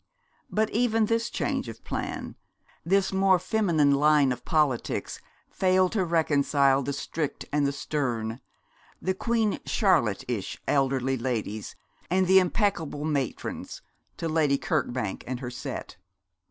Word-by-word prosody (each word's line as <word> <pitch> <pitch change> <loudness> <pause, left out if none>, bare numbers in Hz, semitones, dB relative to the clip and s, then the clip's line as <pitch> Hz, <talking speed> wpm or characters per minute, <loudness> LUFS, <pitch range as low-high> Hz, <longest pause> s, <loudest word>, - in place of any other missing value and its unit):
But 215 0 0
even 225 -1 +2
this 230 +1 0
change - - -2
of - - -10
plan, - - -4 0.5
this 190 +2 +2
more 190 -1 +4
feminine 175 -6 +2
line 145 -1 +4
of 125 -1 -4
politics 150 -6 0 0.3
failed 185 -1 +2
to 205 -4 +1
reconcile 145 -5 +2
the 140 - -3
strict 145 +1 -4
and 145 -1 +2
the - - 0
stern, 125 -5 -3 0.6
the 190 - -1
Queen 225 +1 0
Charlotte 155 - +2
ish 115 -6 -3
elderly 135 -1 +1
ladies, 110 -4 -3 0.3
and 185 +2 +3
the 190 +1 +7
impeccable 175 -6 0
matrons, 140 -5 -3 0.3
to 165 - -3
Lady 155 -3 +2
Kirkbank 120 -6 -2
and 125 -1 -3
her 125 -1 -5
set. 125 - -6
150 Hz, 130 wpm, -27 LUFS, 135-190 Hz, 0.6 s, the